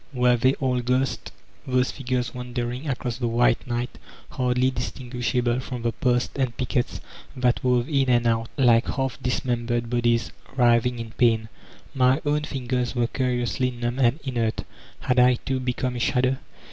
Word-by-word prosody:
Were 125 -1 +4
they 130 +3 +3
all 130 -2 0
ghosts, 125 +2 -1 0.4
those 125 0 +2
figures 125 -3 -2
wander 125 -1 -3
ing 130 +5 -5
across 125 -2 -3
the 120 - 0
white 120 +1 +2
night, 120 0 -3 0.3
hardly 125 0 +1
distinguishable 125 -2 -2
from 125 -2 -6
the 115 - +1
posts 125 0 0
and 130 -4 -1
pickets 125 -1 -1 0.3
that 125 -1 +1
wove 125 -1 +2
in 140 -4 +1
and 120 -1 +3
out, 115 0 +1
like 120 -3 +4
half 135 -2 -2
dismembered 120 -2 -1
bodies 120 -1 +1 0.2
writhing 120 -1 +3
in 115 -1 -6
pain? 110 -2 +2 0.4
My 130 +1 +3
own 150 +1 +1
fingers 125 -3 -2
were 120 -1 +2
curiously 125 0 0
numb 120 +1 -3
and 125 +3 +3
inert; 120 -5 -1 0.4
had 125 -1 +2
I, 125 0 +6
too, 130 +2 -3
become 125 0 -2
a - - -3
shadow? 130 +2 +1
125 Hz, 160 wpm, -24 LUFS, 120-130 Hz, 0.4 s, I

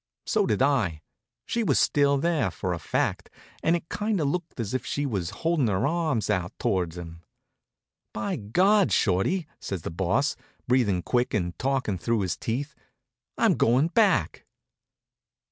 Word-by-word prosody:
So - - +1
did 105 +4 +2
I. 110 - +1 0.4
She 235 - -1
was 220 - +2
still 140 -1 +3
there, 160 - +1
for 90 +1 -3
a 85 - -4
fact, - - -1 0.3
and 165 - +3
it 170 -1 -4
kind 210 -1 -1
of 145 -3 +1
looked 170 -3 -4
as 110 -2 -3
if 130 -1 -1
she 145 - -2
was 100 -10 -2
holding 165 -6 0
her 100 +3 +1
arms 155 -7 0
out 90 -1 -1
toward 90 -3 -1
him. 85 -1 -9 0.9
"By 110 - -3
God, 185 - +3
Shorty," 110 - +1
says 95 -5 -5
the - - -4
Boss, 95 - 0 0.3
breathing 110 -8 +2
quick 125 -1 0
and 90 -4 -1
talking 130 -8 -1
through 115 +3 0
his 95 -2 -1
teeth, 140 +6 -3 0.6
"I'm - - +4
going 130 +8 +3
back." 190 - +2
125 Hz, 160 wpm, -26 LUFS, 95-155 Hz, 0.9 s, I'm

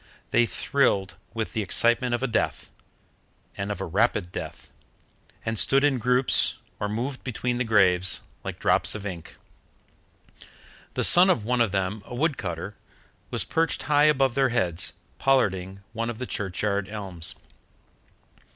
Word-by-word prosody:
They 120 - +3
thrilled 95 0 0 0.2
with 110 -1 -3
the 110 - -1
excitement 120 +5 +1
of 120 - -5
a - - +1
death, 115 - -2 0.8
and 100 +1 -4
of 100 - -5
a 95 - -3
rapid 85 +1 0
death, - - -8 0.7
and 110 -1 -1
stood 135 +1 +3
in 140 -3 +2
groups 125 +2 +5 0.2
or 105 - -2
moved 125 +6 -4
between 125 0 -3
the - - +1
graves, 95 -5 +3 0.2
like - - -6
drops - - +2
of 105 -2 -7
ink. 90 -5 -7 1.6
The - - 0
son 180 +2 +7
of 115 - +1
one 125 +1 +1
of 115 -4 +2
them, 95 +2 -2
a 120 - -7
wood 150 +3 0
cutter, 90 +1 -5 0.5
was - - -2
perched 165 -1 -1
high 145 0 +3
above 135 -4 +3
their 135 0 +2
heads, 90 -8 +1 0.3
pollarding 95 -7 0
one 115 0 -3
of 120 - -5
the 125 - -5
churchyard 100 -1 -2
elms. 95 -6 -8
110 Hz, 150 wpm, -25 LUFS, 95-125 Hz, 1.6 s, son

